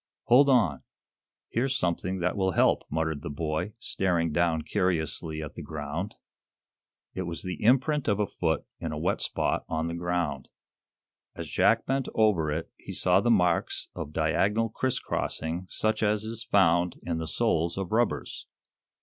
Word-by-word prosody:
"Hold 135 +4 +6
on! 105 - +3 0.7
Here's 130 +3 0
something 90 +1 -1
that 90 - 0
will 95 -2 +1
help," - - +3
muttered 80 -1 -1
the 85 - -5
boy, 80 +6 -2
staring 85 -7 0
down 80 -1 +1
curiously 80 -3 -1
at 75 - -7
the - - -8
ground. 80 +6 -5 1.0
It 95 - -3
was 85 -1 -5
the 90 0 -5
imprint 135 +5 +3
of 105 -2 +2
a 105 - +3
foot 80 -5 -1
in 80 - -4
a 75 - -4
wet 75 - 0
spot - - 0
on 80 0 -1
the 85 - -3
ground. 85 -6 -2 0.9
As - - -6
Jack - - +3
bent 135 -1 0
over 100 -9 +3
it 80 +2 -3
he - - -9
saw - - +3
the - - +1
marks - - +2
of 75 - -6
diagonal 100 +8 +1
criss 130 +3 -1
crossing 85 +3 -3
such 110 0 0
as 105 0 +1
is 115 +1 -5
found 85 -2 +3
in 85 -1 -2
the 80 - -4
soles 85 +3 0
of 95 -2 -3
rubbers. 120 +2 -1
85 Hz, 165 wpm, -28 LUFS, 80-105 Hz, 1.0 s, Hold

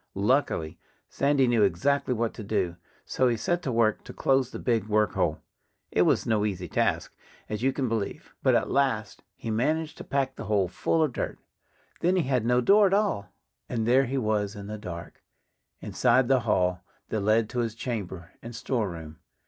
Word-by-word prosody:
Luckily, 100 - 0 0.3
Sandy 140 -1 +2
knew 120 -3 +2
exactly 105 +10 +2
what 115 0 -1
to 110 - -8
do. 100 -4 -1 0.3
So 130 - +1
he 120 -2 +1
set 175 +9 -1
to 135 - -2
work 115 -2 +2
to - - -9
close 135 -2 +2
the - - -7
big 115 -4 0
work 105 -2 +2
hole. - - -1 0.5
It - - +2
was - - +3
no 110 -2 +1
easy 95 -4 -2
task - - 0 0.3
as 105 0 -4
you 135 +2 +2
can 135 -1 -2
believe. 110 -3 -3
But - - +4
at - - +1
last 115 -7 0
he 115 - -5
managed 155 +8 -1
to - - -6
pack 135 -1 -1
the - - -6
hole 100 -3 +2
full 160 - 0
of 150 -5 -1
dirt. - - -3 0.6
Then 180 +2 +2
he 180 - +2
had 125 -4 0
no 125 +1 +3
door 200 - +6
at 195 - +2
all. 195 - 0 0.4
And 115 -3 -1
there 130 +3 +5
he 135 +2 -2
was 105 -4 0
in 100 -1 -8
the 105 +1 -6
dark, 85 -4 -8 0.6
inside 130 -1 +2
the 135 0 +4
hall 90 -3 +2 0.3
that 110 - -1
led 110 +2 +3
to 125 - -3
his 115 -2 -1
chamber 95 -8 -5
and 115 0 -8
storeroom. 85 - -3
115 Hz, 195 wpm, -27 LUFS, 105-135 Hz, 0.6 s, door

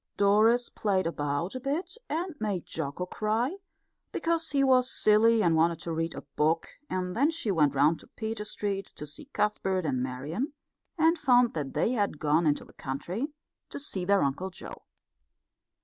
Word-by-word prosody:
Doris 220 +4 +4
played 195 -3 0
about 145 +1 -2
a 255 - -4
bit 300 - -3
and 340 +3 -2
made 200 -5 -2
Jocko 160 +3 -4
cry, 225 - -1 0.5
because 330 -1 -1
he 280 -2 +2
was 255 -1 +4
silly 220 +1 +4
and 165 -2 +3
wanted 165 +1 +3
to 170 - -4
read 165 0 -2
a - - -7
book; 160 +2 +1 0.2
and 180 -1 -2
then 280 +6 +3
she 325 -10 -1
went 150 -6 +3
round 150 +4 +4
to - - -16
Peter 220 -1 -4
Street 200 -2 -3
to 150 - -7
see 150 - -9
Cuthbert 200 - 0
and 130 -4 0
Marian, 145 - -3 0.4
and 325 +1 +3
found 245 -4 +4
that 145 -4 -4
they - - +2
had 205 -9 0
gone 155 +2 +2
into 145 - +1
the - - -18
country 170 - -4 0.4
to - - -6
see 200 -10 0
their 200 +2 +3
Uncle 140 +7 -1
Joe. 185 - -10
200 Hz, 175 wpm, -29 LUFS, 160-245 Hz, 0.5 s, Doris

